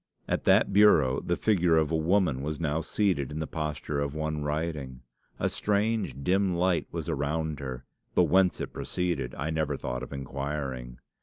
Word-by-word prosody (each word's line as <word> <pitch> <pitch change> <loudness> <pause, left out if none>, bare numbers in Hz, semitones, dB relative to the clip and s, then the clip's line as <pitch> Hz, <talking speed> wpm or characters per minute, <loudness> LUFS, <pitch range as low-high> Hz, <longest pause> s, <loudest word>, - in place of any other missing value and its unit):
At - - -1
that 100 - +4
bureau 80 -11 +5
the - - 0
figure 90 -6 +3
of 80 -1 +2
a - - +2
woman 80 -4 +2
was 75 +1 -3
now 80 -1 0
seated 85 -6 0
in 75 - -5
the 80 - -2
posture 75 -2 -3
of 70 0 -2
one 75 -1 -2
writing. 75 -4 -3 0.4
A - - 0
strange 105 -7 0
dim 95 +1 +2
light 90 0 +1
was 85 -2 -4
around 75 0 -1
her, 65 -2 -6 0.3
but - - +6
whence 95 0 +3
it - - -5
proceeded 85 -8 -2
I 80 +2 -3
never 80 -1 -1
thought 60 0 -4
of 65 - -7
inquiring. 70 -2 -4
75 Hz, 175 wpm, -28 LUFS, 70-90 Hz, 0.4 s, but